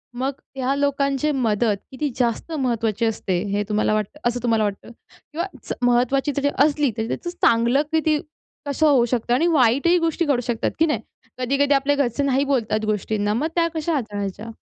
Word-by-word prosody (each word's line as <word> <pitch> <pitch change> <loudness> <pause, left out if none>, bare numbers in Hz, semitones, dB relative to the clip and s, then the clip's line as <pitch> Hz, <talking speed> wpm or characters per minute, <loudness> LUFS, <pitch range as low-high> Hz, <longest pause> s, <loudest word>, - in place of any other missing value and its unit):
मग 260 +3 -1 0.2
ह्या 265 +1 0
लोकांचे 280 +1 0
मदत 225 -5 +1
किती 285 +3 -2
जास्त 240 +5 -1
महत्त्वाची 235 -7 0
असते 200 -5 -1
हे 205 +1 0
तुम्हाला 215 0 +1
वाटतं 215 +7 -2
असं 245 +1 -3
तुम्हाला 225 -2 +2
वाटतं? 205 +2 -4 0.4
किंवा 335 +4 -2 0.2
च - - -4
महत्त्वाची 250 +4 +2
जरी 285 0 +1 0.2
असली, 295 -3 +1
तरी 220 0 -2
त्याचं 345 - -4
चांगलं 240 -5 +3
किती 315 -1 +2 0.5
कसं 290 +2 +1
होऊ 265 -5 +4
शकतं 240 0 -1
आणि 305 +8 +3
वाईटही 285 +3 +3
गोष्टी 330 0 0
घडू 280 -5 +1
शकतात, 235 -2 -1
की 325 - +5
नाही? 305 - 0 0.4
कधी-कधी 275 +3 +1
आपले 280 +1 +2
घरचे 280 -1 0
नाही 275 0 +2
बोलतात 225 -6 0
गोष्टींना 210 0 -1
मग 265 +8 0
त्या 335 -1 +3
कशा 320 +1 -1
हाताळायच्या? 210 -3 -4
260 Hz, 175 wpm, -22 LUFS, 225-285 Hz, 0.5 s, की